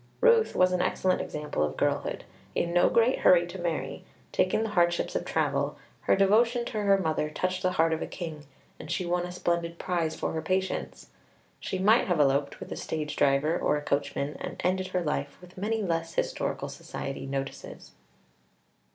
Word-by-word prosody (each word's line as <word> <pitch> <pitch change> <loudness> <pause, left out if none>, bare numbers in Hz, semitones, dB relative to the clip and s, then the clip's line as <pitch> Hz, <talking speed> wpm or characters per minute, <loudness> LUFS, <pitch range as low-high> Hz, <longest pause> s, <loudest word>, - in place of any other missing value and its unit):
Ruth 470 -2 +4
was 185 0 +4
an 180 -1 +1
excellent 185 0 +1
example 150 - -4
of 75 -1 -1
girlhood. - - -1 0.3
In 170 0 0
no 175 - +5
great 235 +3 +3
hurry 175 -1 +6
to 175 +2 -8
marry, 170 -3 -3 0.3
taking 185 +4 +2
the 225 - -2
hardships 175 -4 +1
of - - -1
travel, - - 0 0.2
her - - +3
devotion 230 +5 +3
to 215 -3 -3
her 200 -1 +4
mother 160 -4 -1
touched 185 +4 -2
the 185 -1 +1
heart 165 -2 +3
of 160 - -2
a - - -3
king, 155 -5 -7 0.3
and 155 - -9
she 175 +1 -1
won 175 0 0
a - - -7
splendid 170 -1 -1
prize 170 -4 -1
for - - -2
her 160 - -2
patience. 185 +3 -2 0.5
She 190 - -3
might 210 +6 +4
have 175 -4 +1
eloped 140 0 +2
with - - -9
a - - -3
stage 150 -2 -4
driver 140 +4 +3
or 150 - +1
a - - -4
coachman, 140 0 -1
and - - -6
ended 185 +1 +1
her 180 -1 -1
life 140 -2 -2
with 180 0 -15
many 215 +3 -1
less 165 -2 -2
historical - - -1
society 135 0 -6
notices. 135 0 -6
175 Hz, 185 wpm, -28 LUFS, 155-190 Hz, 0.5 s, hurry